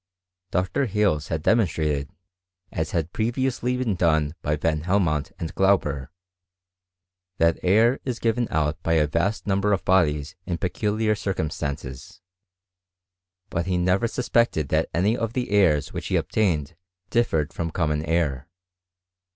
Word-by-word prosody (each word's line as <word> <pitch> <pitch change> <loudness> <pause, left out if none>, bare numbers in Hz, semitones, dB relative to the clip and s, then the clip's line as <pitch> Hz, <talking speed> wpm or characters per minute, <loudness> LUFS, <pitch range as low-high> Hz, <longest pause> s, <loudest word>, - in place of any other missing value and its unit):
Dr. 95 +9 0
Hales 100 -8 +1
had 80 -1 -3
de - - +4
monstrated 75 -9 0 0.6
(as 80 - -2
had 85 -1 -2
previously 125 +2 -1
been 125 -5 0
done 80 -4 +1
by 75 0 0
Van 75 0 0
Hel 90 +5 +2
inont 75 -6 0
and 80 - -5
Glauber) 75 -9 +1 1.3
that 85 0 +2
air 110 +8 +4
is 125 -3 -3
given 120 0 0
out 75 -1 -1
by 80 - 0
a 80 -2 +4
vast 85 +9 -1
number 100 +1 +1
of 95 - -1
bodies 80 -4 +2
in 85 - -1
peculiar 105 +5 0
circumstances. 75 - -4 1.3
But 85 +1 -2
he 90 -1 +1
never 90 +6 +2
suspected 115 - +1
that 80 +1 +1
any 100 +7 +2
of 115 -1 -3
the 125 -3 -2
airs 90 -8 +3
which - - -4
he - - 0
obtained 85 -7 0 0.4
differed 80 -11 +1
from 85 -1 -3
common 75 -2 -1
air. 75 -5 0
85 Hz, 145 wpm, -24 LUFS, 75-105 Hz, 1.3 s, de